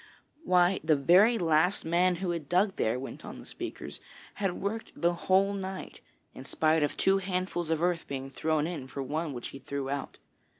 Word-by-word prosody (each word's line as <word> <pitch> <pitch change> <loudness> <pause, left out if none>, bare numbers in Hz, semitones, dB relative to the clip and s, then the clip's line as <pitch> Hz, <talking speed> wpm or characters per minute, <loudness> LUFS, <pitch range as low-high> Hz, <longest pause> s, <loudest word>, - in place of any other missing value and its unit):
'Why, 180 - +4
the 155 -1 +4
very 185 - +5
last 170 +1 +2
man 175 +2 +3
who 180 0 -2
had 165 -5 -5
dug 190 +3 +2
there,' 115 +3 +1
went 135 - -8
on - - -8
the - - -11
speakers, - - -7 0.3
'had 195 -3 -2
worked 220 +3 -4
the 170 +1 +3
whole 190 +3 +2
night, 190 -1 -6 0.3
in 130 - -9
spite 155 +3 +2
of 145 - 0
two 195 0 +3
handfuls 180 -3 -2
of 160 0 0
earth 175 -1 0
being 135 -1 -5
thrown 155 +1 0
in 160 -6 -5
for 135 +1 -5
one 155 +4 -2
which 120 -3 -5
he 135 - -9
threw 140 0 -4
out. 140 -1 -4
170 Hz, 195 wpm, -29 LUFS, 145-185 Hz, 0.3 s, very